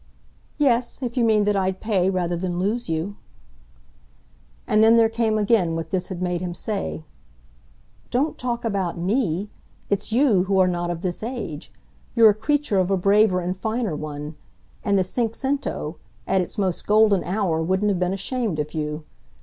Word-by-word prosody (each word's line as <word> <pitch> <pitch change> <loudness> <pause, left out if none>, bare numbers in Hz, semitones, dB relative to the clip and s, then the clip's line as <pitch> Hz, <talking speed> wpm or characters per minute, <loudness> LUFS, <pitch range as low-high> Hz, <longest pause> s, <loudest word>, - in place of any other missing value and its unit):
"Yes, 255 -2 +1
if 240 -1 -3
you 245 - +2
mean 215 -2 +4
that 205 0 +1
I'd 190 -1 0
pay 195 -4 +1
rather 175 -2 -1
than 175 0 -3
lose 210 +4 -1
you." 165 +5 -2 1.5
And 215 - +3
then 225 +1 +6
there 225 -1 +5
came 225 -1 0
again 205 -6 +2
what 165 0 -5
this 185 -2 -1
had 185 -2 -5
made 180 -1 -1
him 175 -1 -4
say. 200 -4 -4 1.1
"Don't 280 +6 0
talk 240 -1 -3
about 195 -6 -1
ME 195 0 -1 0.4
it's 200 +2 -1
you 225 -7 +3
who 195 0 +1
are 185 -1 +5
not 175 -1 -1
of 175 +1 -4
this 180 -2 -2
age. 225 - -5 0.4
You're 225 -2 +8
a - - -1
creature 250 0 0
of 185 0 +1
a 195 - +2
braver 195 0 +3
and 180 +1 -2
finer 220 -2 -2
one, 150 0 -6 0.5
and 200 -1 +2
the 190 - +3
cinquecento, 230 - -2 0.3
at 190 - +2
its 180 - -6
most 190 -4 -1
golden 210 -3 +4
hour, 180 -5 0
wouldn't 190 +5 +1
have 190 -3 0
been 180 0 +1
ashamed 205 -1 -2
of 150 0 -3
you. 150 -1 -3
195 Hz, 175 wpm, -23 LUFS, 175-225 Hz, 1.5 s, You're